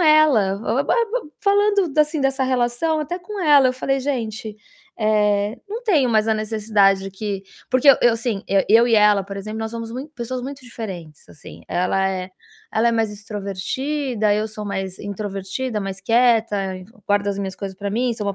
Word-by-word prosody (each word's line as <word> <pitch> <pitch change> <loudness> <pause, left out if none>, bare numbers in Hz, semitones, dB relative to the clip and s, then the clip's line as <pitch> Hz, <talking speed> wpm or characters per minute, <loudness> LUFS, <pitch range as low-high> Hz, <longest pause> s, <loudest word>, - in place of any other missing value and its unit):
ela, 305 - +4
ba-ba 270 +5 +1 0.5
falando 405 -4 +2
assim 300 0 +2
dessa 270 0 +1
relação, 255 +5 0
até 305 +4 -4
com 400 +3 -8
ela 290 -5 +6
eu 255 - 0
falei: 270 +1 -1
"Gente, 225 -5 -3 0.4
eh, 210 0 +1
não 445 +4 -5
tenho 315 - +3
mais 220 -1 +2
a 220 - +3
necessidade 215 -2 +2
de 195 - -6
que", 195 0 -4 0.3
porque 255 +2 +3
eu - - +5
eu, 235 -1 +4
sim, 225 -4 -2 0.3
eu 230 +3 +6
e 230 - +4
ela, 210 -2 +5
por 200 0 -7
exemplo, 215 +3 -6
nós 220 0 -3
somos 230 -1 -5
muito 270 +5 -6
pessoas 250 0 -4
muito 275 +1 -7
diferentes 190 -11 -8
assim, 150 - -13
ela 190 +2 +1
é 185 0 -4 0.4
ela 225 +2 +3
é - - +1
mais 225 -2 +1
extrovertida, 215 +4 -2
eu 215 +1 -1
sou 215 0 -7
mais 190 -2 -4
introvertida, 205 +3 -4
mais 195 0 -5
quieta, 220 -4 +2
enf 185 +4 -14 0.2
guardo 205 0 +1
as 200 0 -2
minhas 190 -1 -4
coisas 195 -2 -6
para 200 0 -4
mim, 240 +3 0
sou 210 -2 -5
uma 200 - -1
220 Hz, 185 wpm, -21 LUFS, 200-260 Hz, 0.5 s, ela